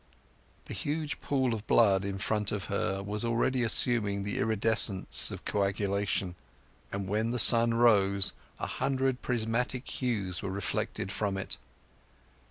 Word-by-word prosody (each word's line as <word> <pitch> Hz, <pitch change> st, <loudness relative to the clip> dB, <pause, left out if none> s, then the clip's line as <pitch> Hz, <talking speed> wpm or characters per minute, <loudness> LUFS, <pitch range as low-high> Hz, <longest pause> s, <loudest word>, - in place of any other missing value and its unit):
The -, -, -8 dB
huge 150 Hz, +1 st, -4 dB
pool 130 Hz, -4 st, 0 dB
of 110 Hz, -1 st, -6 dB
blood 100 Hz, -4 st, +3 dB
in 100 Hz, 0 st, -4 dB
front 105 Hz, +1 st, 0 dB
of 100 Hz, -3 st, -4 dB
her 95 Hz, +1 st, -2 dB
was 105 Hz, +2 st, -4 dB
already 120 Hz, +2 st, 0 dB
assuming 110 Hz, -3 st, +2 dB
the 100 Hz, 0 st, -4 dB
iridescence 110 Hz, -2 st, +3 dB
of -, -, -9 dB
coagulation; 100 Hz, -2 st, -1 dB, 0.6 s
and 100 Hz, -1 st, -4 dB
when 110 Hz, +3 st, -1 dB
the 125 Hz, -, -2 dB
sun 115 Hz, 0 st, +7 dB
rose 100 Hz, -5 st, +3 dB, 0.3 s
a -, -, -3 dB
hundred 130 Hz, -1 st, -2 dB
prismatic 125 Hz, +2 st, -2 dB
hues 100 Hz, -8 st, -2 dB
were 100 Hz, -, -4 dB
reflected 95 Hz, 0 st, -3 dB
from 100 Hz, -1 st, -2 dB
it. 95 Hz, -, -4 dB
105 Hz, 140 wpm, -29 LUFS, 100-120 Hz, 0.6 s, sun